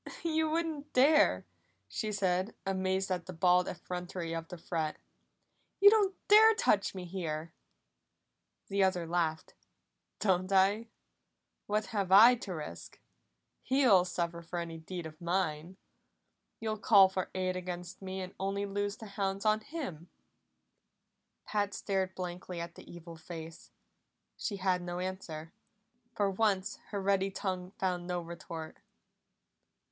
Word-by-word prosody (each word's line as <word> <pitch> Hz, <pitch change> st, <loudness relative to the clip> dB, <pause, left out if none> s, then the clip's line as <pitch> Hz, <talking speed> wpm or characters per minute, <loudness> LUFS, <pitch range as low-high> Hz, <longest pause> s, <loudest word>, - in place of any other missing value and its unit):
"You 320 Hz, -1 st, +1 dB
wouldn't 310 Hz, -2 st, -2 dB
dare!" 265 Hz, -, +5 dB, 0.4 s
she 215 Hz, -, -3 dB
said, 190 Hz, 0 st, 0 dB
amazed 190 Hz, 0 st, 0 dB
at 175 Hz, -2 st, -2 dB
the 185 Hz, -, -6 dB
bald 180 Hz, +1 st, +3 dB
effrontery 180 Hz, -1 st, -5 dB
of 165 Hz, 0 st, -4 dB
the 180 Hz, -, -8 dB
threat. 160 Hz, -2 st, -3 dB, 0.8 s
"You 405 Hz, +1 st, +9 dB
don't 405 Hz, -3 st, +3 dB
dare 440 Hz, +2 st, +8 dB
touch 215 Hz, -, +2 dB
me 185 Hz, -1 st, -5 dB
here!" 165 Hz, -3 st, -4 dB, 1.1 s
The 195 Hz, 0 st, +2 dB
other 185 Hz, -3 st, +1 dB
laughed. 165 Hz, -2 st, -1 dB, 0.6 s
"Don't 185 Hz, -1 st, +1 dB
I? 200 Hz, +4 st, +3 dB, 0.8 s
What 210 Hz, +1 st, 0 dB
have 195 Hz, -3 st, -1 dB
I 220 Hz, +6 st, +9 dB
to 205 Hz, -6 st, -5 dB
risk? 150 Hz, -, -8 dB, 0.6 s
He'll 255 Hz, -9 st, +5 dB
suffer 170 Hz, -1 st, -3 dB
for 170 Hz, +1 st, -6 dB
any 165 Hz, -1 st, -4 dB
deed 175 Hz, +1 st, -6 dB
of 155 Hz, +1 st, -10 dB
mine! 175 Hz, -1 st, -1 dB, 0.8 s
You'll 220 Hz, -1 st, -3 dB
call 200 Hz, -3 st, +7 dB
for 190 Hz, -1 st, -3 dB
aid 185 Hz, -1 st, 0 dB
against 180 Hz, 0 st, -6 dB
me 190 Hz, 0 st, -5 dB
and 185 Hz, 0 st, -7 dB
only 195 Hz, +1 st, -1 dB
loose 205 Hz, 0 st, -2 dB
the 220 Hz, -, -10 dB
hounds 195 Hz, -1 st, -3 dB
on 215 Hz, 0 st, +4 dB
him." 215 Hz, -, -7 dB, 1.4 s
Pat 205 Hz, -1 st, -1 dB
stared 190 Hz, -2 st, -1 dB
blankly 180 Hz, -1 st, -5 dB
at 170 Hz, 0 st, -5 dB
the -, -, -13 dB
evil 170 Hz, -1 st, -10 dB
face. 160 Hz, 0 st, -9 dB, 0.7 s
She 205 Hz, -, -3 dB
had 185 Hz, -1 st, +1 dB
no 175 Hz, 0 st, -4 dB
answer; 180 Hz, -4 st, -5 dB, 0.6 s
for 205 Hz, -, +2 dB
once 195 Hz, -1 st, 0 dB
her 205 Hz, -, -3 dB
ready 195 Hz, 0 st, +2 dB
tongue 185 Hz, -2 st, -3 dB
found 180 Hz, -2 st, -1 dB
no 180 Hz, -1 st, -1 dB
retort. 165 Hz, -1 st, -8 dB
185 Hz, 135 wpm, -32 LUFS, 175-205 Hz, 1.4 s, You